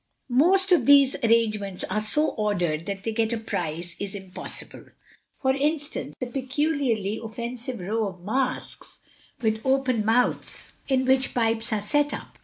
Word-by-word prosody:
Most 370 Hz, +10 st, +4 dB
of 350 Hz, -, +4 dB
these 280 Hz, -2 st, +7 dB
arrangements 215 Hz, -4 st, +1 dB
are 215 Hz, -, -1 dB
so 300 Hz, +9 st, +2 dB
ordered 175 Hz, -7 st, -1 dB
that 195 Hz, -1 st, -4 dB
to 225 Hz, -, -1 dB
get 225 Hz, 0 st, 0 dB
a -, -, 0 dB
prize 170 Hz, -5 st, -4 dB
is 200 Hz, 0 st, -4 dB
impossible. 190 Hz, -2 st, -8 dB, 0.6 s
For 265 Hz, -, +4 dB
instance, 290 Hz, +2 st, -2 dB
a 255 Hz, -, -2 dB
peculiarly 260 Hz, -5 st, -1 dB
offensive 235 Hz, +2 st, -5 dB
row 215 Hz, +4 st, -1 dB
of 185 Hz, -2 st, -9 dB
masks 255 Hz, +5 st, -3 dB, 0.5 s
with 220 Hz, 0 st, +1 dB
open 265 Hz, -4 st, +2 dB
mouths 230 Hz, +3 st, 0 dB, 0.2 s
in 260 Hz, -1 st, +2 dB
which 265 Hz, 0 st, +2 dB
pipes 225 Hz, -1 st, +1 dB
are 210 Hz, -2 st, 0 dB
set 290 Hz, +6 st, +1 dB
up. -, -, -11 dB
230 Hz, 150 wpm, -25 LUFS, 210-265 Hz, 0.6 s, these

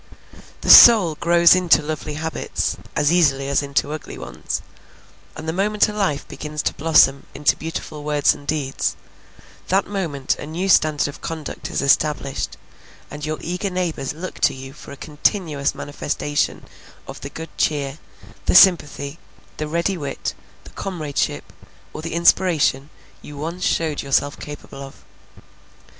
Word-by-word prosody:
The -, -, -4 dB
soul 210 Hz, -9 st, +9 dB
grows 170 Hz, +2 st, +5 dB
into 180 Hz, -4 st, +3 dB
lovely 150 Hz, -1 st, -5 dB
habits 160 Hz, +1 st, -3 dB, 0.2 s
as 150 Hz, +1 st, +2 dB
easily 140 Hz, -6 st, +2 dB
as 140 Hz, -, +2 dB
into 140 Hz, +1 st, -1 dB
ugly 155 Hz, -, -8 dB
ones, -, -, -5 dB, 0.7 s
and 155 Hz, 0 st, -8 dB
the 160 Hz, -, -1 dB
moment 205 Hz, +3 st, +2 dB
a -, -, -5 dB
life 190 Hz, -9 st, -1 dB
begins 150 Hz, 0 st, -5 dB
to -, -, 0 dB
blossom 140 Hz, -3 st, +3 dB
into 145 Hz, -, +2 dB
beautiful 155 Hz, -2 st, -6 dB
words 150 Hz, -1 st, +2 dB
and 145 Hz, -, -14 dB
deeds, 145 Hz, -4 st, -1 dB, 0.7 s
that 195 Hz, +1 st, +2 dB
moment 165 Hz, -10 st, -2 dB
a -, -, -8 dB
new 175 Hz, +5 st, -3 dB
standard 155 Hz, -5 st, +3 dB
of 145 Hz, -, -9 dB
conduct 160 Hz, -3 st, -6 dB
is -, -, -2 dB
established, 140 Hz, -1 st, 0 dB, 0.5 s
and 150 Hz, +1 st, -6 dB
your 155 Hz, 0 st, -2 dB
eager 180 Hz, +3 st, -3 dB
neighbors 175 Hz, -7 st, -2 dB
look 175 Hz, +5 st, -8 dB
to 145 Hz, -3 st, +2 dB
you 135 Hz, 0 st, -10 dB
for 150 Hz, -, -13 dB
a 140 Hz, -, -9 dB
continuous 150 Hz, -1 st, -1 dB
manifestation 145 Hz, 0 st, -3 dB, 0.4 s
of -, -, -9 dB
the 140 Hz, -, -6 dB
good 160 Hz, +2 st, -9 dB
cheer, 145 Hz, -1 st, -1 dB, 0.5 s
the -, -, +2 dB
sympathy, 165 Hz, -5 st, +4 dB, 0.4 s
the 155 Hz, -, -3 dB
ready 170 Hz, +4 st, -1 dB
wit, 140 Hz, -2 st, -4 dB, 0.3 s
the -, -, -14 dB
comradeship, 160 Hz, -7 st, -3 dB, 0.4 s
or -, -, -6 dB
the 165 Hz, 0 st, -5 dB
inspiration, 165 Hz, -5 st, +2 dB, 0.3 s
you 145 Hz, -, -11 dB
once 165 Hz, +5 st, -5 dB
showed 160 Hz, -3 st, 0 dB
yourself 140 Hz, +1 st, 0 dB
capable 145 Hz, -1 st, -9 dB
of. 135 Hz, -1 st, -11 dB
155 Hz, 150 wpm, -21 LUFS, 145-170 Hz, 0.7 s, soul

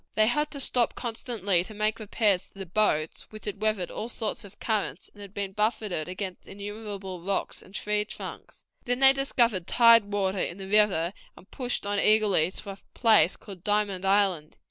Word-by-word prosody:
They 215 Hz, -, +4 dB
had 295 Hz, +6 st, 0 dB
to 285 Hz, -, -7 dB
stop 245 Hz, -3 st, +4 dB
constantly 225 Hz, -7 st, -1 dB
to 215 Hz, +3 st, -11 dB
make 215 Hz, +2 st, -1 dB
repairs 205 Hz, -3 st, +1 dB
to -, -, -22 dB
the 195 Hz, -, -6 dB
boats, 165 Hz, -4 st, 0 dB
which 215 Hz, 0 st, -11 dB
had 205 Hz, 0 st, -5 dB
weathered 215 Hz, -5 st, -1 dB
all 225 Hz, -, -5 dB
sorts 220 Hz, -3 st, -3 dB
of 200 Hz, 0 st, -14 dB
currents, 215 Hz, -3 st, -2 dB
and 205 Hz, -, -14 dB
had 200 Hz, -2 st, -10 dB
been 200 Hz, -1 st, -4 dB
buffeted 210 Hz, -5 st, -1 dB
against 185 Hz, 0 st, -6 dB
innumerable 200 Hz, -2 st, -7 dB
rocks 195 Hz, +2 st, -2 dB
and 190 Hz, -, -16 dB
tree 210 Hz, 0 st, 0 dB
trunks. 210 Hz, -, -10 dB, 0.2 s
Then 245 Hz, 0 st, 0 dB
they 270 Hz, 0 st, +8 dB
discovered 235 Hz, -9 st, +1 dB
tide 230 Hz, -2 st, +6 dB
water 195 Hz, -1 st, 0 dB
in 175 Hz, -, -3 dB
the 190 Hz, -1 st, -8 dB
river, 195 Hz, -4 st, +3 dB, 0.2 s
and 190 Hz, -, -18 dB
pushed 250 Hz, -5 st, -3 dB
on 205 Hz, 0 st, -1 dB
eagerly 210 Hz, -7 st, +3 dB
to 200 Hz, -, -6 dB
a 195 Hz, -, -11 dB, 0.2 s
place 220 Hz, -6 st, +4 dB
called 190 Hz, -5 st, -12 dB
Diamond 205 Hz, -3 st, 0 dB
Island. 195 Hz, -6 st, +1 dB
205 Hz, 190 wpm, -27 LUFS, 190-220 Hz, 0.2 s, they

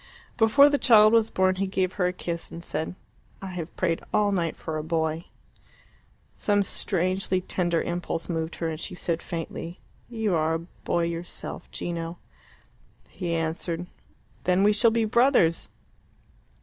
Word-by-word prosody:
Before 240 Hz, +5 st, +6 dB
the 290 Hz, -1 st, +2 dB
child 215 Hz, -3 st, +7 dB
was 225 Hz, -1 st, +4 dB
born 185 Hz, 0 st, +2 dB
he 195 Hz, +1 st, 0 dB
gave 185 Hz, -1 st, 0 dB
her 180 Hz, -2 st, +1 dB
a -, -, 0 dB
kiss, 170 Hz, -2 st, -4 dB
and 170 Hz, +1 st, -8 dB
said, 160 Hz, +4 st, -3 dB, 0.4 s
"I 195 Hz, -1 st, -6 dB
have 175 Hz, -2 st, -6 dB
prayed 170 Hz, -3 st, 0 dB
all 205 Hz, -1 st, +3 dB
night 170 Hz, -4 st, 0 dB
for 155 Hz, -1 st, -4 dB
a -, -, -4 dB
boy." 160 Hz, 0 st, -1 dB, 1.1 s
Some 205 Hz, -1 st, +2 dB
strangely 185 Hz, 0 st, 0 dB
tender 175 Hz, -2 st, 0 dB
impulse 175 Hz, -1 st, -3 dB
moved 165 Hz, -1 st, -2 dB
her, 165 Hz, -, -2 dB
and 160 Hz, -1 st, -4 dB
she 180 Hz, -, -5 dB
said 170 Hz, -1 st, -2 dB
faintly, 170 Hz, +1 st, -6 dB, 0.3 s
"You 220 Hz, -5 st, -1 dB
are 160 Hz, 0 st, +2 dB
a -, -, -1 dB, 0.3 s
boy 170 Hz, -, +1 dB
yourself, 170 Hz, +1 st, -5 dB
Gino." 170 Hz, 0 st, -4 dB, 0.9 s
He 175 Hz, -3 st, -3 dB
answered, 165 Hz, +1 st, -2 dB, 0.6 s
"Then 185 Hz, +1 st, +3 dB
we 210 Hz, +1 st, +5 dB
shall 230 Hz, +2 st, +5 dB
be 225 Hz, 0 st, +1 dB
brothers." 225 Hz, -, +3 dB
175 Hz, 155 wpm, -26 LUFS, 165-200 Hz, 1.1 s, child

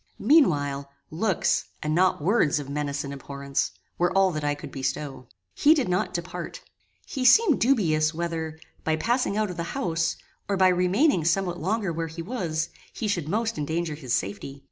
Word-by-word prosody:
Meanwhile, 145 Hz, -, +3 dB, 0.2 s
looks, 185 Hz, +3 st, +1 dB, 0.2 s
and 150 Hz, 0 st, 0 dB
not 180 Hz, -3 st, +2 dB
words 180 Hz, -6 st, +3 dB
of 145 Hz, -2 st, -4 dB
menace 145 Hz, 0 st, -2 dB
and 140 Hz, 0 st, -6 dB
abhorrence, 140 Hz, 0 st, -3 dB, 0.3 s
were 175 Hz, 0 st, +2 dB
all 190 Hz, -1 st, +4 dB
that 155 Hz, -2 st, -4 dB
I 145 Hz, 0 st, +1 dB
could 145 Hz, -, -9 dB
bestow. 135 Hz, -1 st, -4 dB, 0.3 s
He 305 Hz, -, +5 dB
did 275 Hz, -9 st, 0 dB
not 180 Hz, 0 st, 0 dB
depart. 180 Hz, -, -5 dB, 0.4 s
He 265 Hz, -, -4 dB
seemed 315 Hz, -, +6 dB
dubious, 165 Hz, -, +3 dB
whether, 160 Hz, -1 st, -3 dB, 0.3 s
by 160 Hz, -, +1 dB
passing 235 Hz, +3 st, 0 dB
out 215 Hz, -3 st, 0 dB
of 175 Hz, -, -8 dB
the 170 Hz, +10 st, -4 dB
house, 165 Hz, -8 st, 0 dB, 0.3 s
or 200 Hz, -, +1 dB
by 185 Hz, 0 st, +5 dB
remaining 180 Hz, -, +3 dB
somewhat 175 Hz, +2 st, 0 dB
longer 195 Hz, 0 st, 0 dB
where 165 Hz, 0 st, -2 dB
he 165 Hz, +1 st, -7 dB
was, 170 Hz, -7 st, -2 dB, 0.2 s
he 220 Hz, -, -4 dB
should 175 Hz, -7 st, -1 dB
most 225 Hz, +1 st, -1 dB
endanger 160 Hz, +2 st, -2 dB
his 135 Hz, -6 st, -2 dB
safety. 120 Hz, +8 st, -4 dB
170 Hz, 175 wpm, -26 LUFS, 150-200 Hz, 0.4 s, seemed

